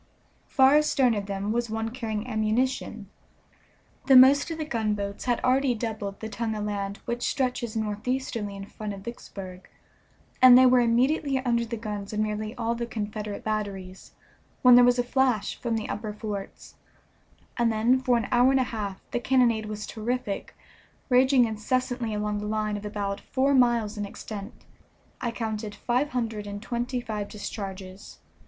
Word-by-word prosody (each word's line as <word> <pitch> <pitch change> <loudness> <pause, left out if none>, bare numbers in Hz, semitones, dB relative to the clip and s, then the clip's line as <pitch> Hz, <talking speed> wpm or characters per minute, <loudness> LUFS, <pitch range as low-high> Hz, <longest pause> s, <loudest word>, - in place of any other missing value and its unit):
Far 270 +1 +5
astern 275 -5 +3
of 205 -2 -3
them 200 +1 -2
was 235 0 -1
one 225 +1 -2
carrying 225 -3 -4
ammunition. 220 -1 -1 1.0
The 270 - +7
most 270 +4 +7
of 325 - -4
the 310 - -3
gunboats 210 -6 -2
had 245 -2 +1
already 255 0 +3
doubled 215 -3 -5
the 220 - -4
tongue 220 0 -3
of 210 -1 -3
land 200 -1 -3
which 240 0 -3
stretches 250 -4 -1
northeasterly 220 0 -2
in 195 0 -7
front 210 0 -6
of 195 - -10
Vicksburg, 190 -4 -9 0.7
and 255 -1 +10
they 260 - +7
were 255 0 +6
immediately 265 +5 +2
under 235 -1 +2
the 230 0 -5
guns 210 -2 -5
of 210 - -2
nearly 215 +1 -2
all 230 -1 -1
the 235 0 -4
Confederate 210 -2 -5
batteries, 195 -3 -4 0.5
when 250 -1 +8
there 245 0 +9
was 245 0 +4
a 245 - +2
flash 250 -4 +1
from 235 -2 -2
the 215 - -4
upper 210 0 -4
forts, 205 -2 -7 0.8
and 235 -1 +2
then 230 +4 +3
for 255 -2 +2
an 230 - -2
hour 245 +1 +5
and 270 0 +3
a - - +3
half 205 -5 -5
the - - 0
cannonade 240 -4 +2
was 210 0 -5
terrific, 225 -2 -4 0.5
raging 255 0 +5
incessantly 240 +2 -1
along 210 0 -2
the 210 - -4
line 215 0 -1
of 205 0 -5
about 200 -1 -3
four 275 +2 +1
miles 235 -4 +2
in 205 - -2
extent. 200 0 -9 0.6
I 240 - -1
counted 220 -2 -4
five 250 +4 0
hundred 225 -5 -3
and 205 0 -5
twenty 240 +3 -3
five 215 -4 -4
discharges. 195 -2 -7
225 Hz, 170 wpm, -26 LUFS, 210-250 Hz, 1.0 s, and